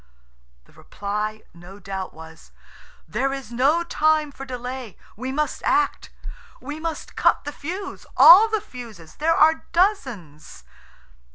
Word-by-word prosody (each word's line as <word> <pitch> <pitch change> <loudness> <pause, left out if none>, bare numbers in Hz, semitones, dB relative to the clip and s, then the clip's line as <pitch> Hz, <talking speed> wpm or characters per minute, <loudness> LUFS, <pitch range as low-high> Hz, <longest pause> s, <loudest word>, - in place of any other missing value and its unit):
The - - -24
reply 210 +2 -5
no 175 +3 -13
doubt 195 -1 -6
was, 160 - -14 0.6
"There 250 +12 -1
is 270 -4 -6
no 280 +8 +2
time 310 -2 +1
for 270 0 -9
delay; 250 -3 -7 0.2
we 255 +4 -5
must 300 0 -2
act. 390 +2 0 0.5
We 290 +4 -7
must 325 -1 -5
cut - - +2
the 290 - -5
fuse–all 370 +4 +5
the 435 -1 -1
fuses; 230 - -12
there 325 +2 +2
are 320 +1 +3
dozens." 260 - -1
265 Hz, 125 wpm, -23 LUFS, 205-315 Hz, 0.6 s, fuse–all